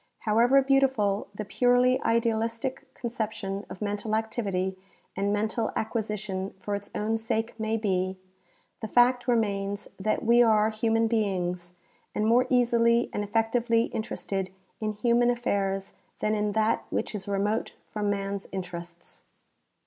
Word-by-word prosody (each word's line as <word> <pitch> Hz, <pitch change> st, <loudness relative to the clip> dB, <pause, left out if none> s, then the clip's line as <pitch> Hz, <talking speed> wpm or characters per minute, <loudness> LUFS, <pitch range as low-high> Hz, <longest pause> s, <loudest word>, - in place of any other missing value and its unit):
However 240 Hz, +5 st, +4 dB
beautiful 265 Hz, -7 st, +2 dB
the 215 Hz, -, -4 dB
purely 250 Hz, +4 st, +3 dB
idealistic 230 Hz, +3 st, -1 dB
conception 215 Hz, -4 st, -4 dB
of 200 Hz, -, -6 dB
mental 205 Hz, +1 st, -1 dB
activity 200 Hz, -4 st, -1 dB, 0.4 s
and 200 Hz, +1 st, 0 dB
mental 220 Hz, +2 st, 0 dB
acquisition 210 Hz, -4 st, -3 dB
for 205 Hz, +2 st, -4 dB
its 200 Hz, 0 st, -4 dB
own 220 Hz, +2 st, 0 dB
sake 225 Hz, 0 st, -1 dB
may 220 Hz, +1 st, 0 dB
be, 190 Hz, -3 st, -1 dB, 0.6 s
the 220 Hz, -, -4 dB
fact 245 Hz, +2 st, +3 dB
remains 205 Hz, -4 st, 0 dB
that 215 Hz, +4 st, -1 dB
we 235 Hz, +1 st, +6 dB
are 220 Hz, -2 st, +4 dB
human 225 Hz, +1 st, +1 dB
beings 180 Hz, -5 st, -1 dB, 0.4 s
and 210 Hz, -, +1 dB
more 245 Hz, +3 st, +4 dB
easily 235 Hz, -1 st, +3 dB
and 205 Hz, -, -1 dB
efiectively 230 Hz, +2 st, +1 dB
interested 195 Hz, -3 st, -3 dB, 0.3 s
in 215 Hz, -1 st, -2 dB
human 235 Hz, +3 st, +3 dB
affairs 195 Hz, -5 st, -1 dB, 0.2 s
than 215 Hz, -, 0 dB
in 210 Hz, -1 st, 0 dB
that 220 Hz, +1 st, +1 dB
which -, -, -2 dB
is 205 Hz, -2 st, -5 dB
remote 200 Hz, +2 st, -1 dB
from 210 Hz, -1 st, -2 dB
man's 200 Hz, 0 st, -2 dB
interests. 175 Hz, -2 st, -7 dB
215 Hz, 135 wpm, -27 LUFS, 200-230 Hz, 0.6 s, we